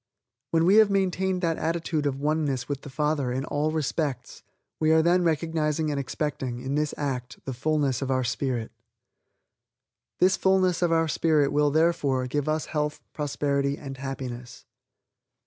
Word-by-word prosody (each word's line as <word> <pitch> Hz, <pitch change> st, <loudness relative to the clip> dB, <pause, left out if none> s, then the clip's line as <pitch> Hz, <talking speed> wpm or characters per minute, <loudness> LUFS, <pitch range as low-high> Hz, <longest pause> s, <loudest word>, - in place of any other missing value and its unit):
When 165 Hz, 0 st, +2 dB
we 195 Hz, +4 st, +6 dB
have 220 Hz, -2 st, +7 dB
maintained 190 Hz, -1 st, 0 dB
that 165 Hz, -1 st, 0 dB
attitude 160 Hz, -2 st, -1 dB
of 135 Hz, -1 st, -2 dB
one 155 Hz, +2 st, +1 dB
ness 135 Hz, -4 st, -2 dB
with 140 Hz, -1 st, -3 dB
the 145 Hz, -, -9 dB
Father 150 Hz, -2 st, 0 dB
in 130 Hz, +2 st, -2 dB
all 150 Hz, +1 st, 0 dB
respects, 150 Hz, -4 st, -2 dB, 0.4 s
we 155 Hz, 0 st, +3 dB
are 160 Hz, 0 st, +5 dB
then 175 Hz, +2 st, +3 dB
recognizing 160 Hz, -1 st, 0 dB
and 145 Hz, -, -1 dB
expecting, 135 Hz, -2 st, -3 dB
in 130 Hz, +3 st, -4 dB
this 150 Hz, 0 st, 0 dB
act, 125 Hz, -4 st, -3 dB
the 135 Hz, -, -3 dB
fullness 140 Hz, 0 st, 0 dB
of 135 Hz, -, -2 dB
our 130 Hz, -1 st, +1 dB
spirit. 125 Hz, -2 st, -2 dB, 1.5 s
This 185 Hz, +2 st, +4 dB
fullness 185 Hz, -2 st, +2 dB
of 175 Hz, -1 st, +2 dB
our 165 Hz, 0 st, +3 dB
spirit 155 Hz, -2 st, +2 dB
will, 145 Hz, 0 st, +3 dB
therefore, 145 Hz, -4 st, +2 dB
give 145 Hz, +3 st, -2 dB
us 155 Hz, 0 st, 0 dB
health, 150 Hz, 0 st, -2 dB
prosperity 140 Hz, -1 st, -1 dB
and 135 Hz, -2 st, -8 dB
happiness. 125 Hz, -2 st, -7 dB
150 Hz, 165 wpm, -26 LUFS, 135-160 Hz, 1.5 s, have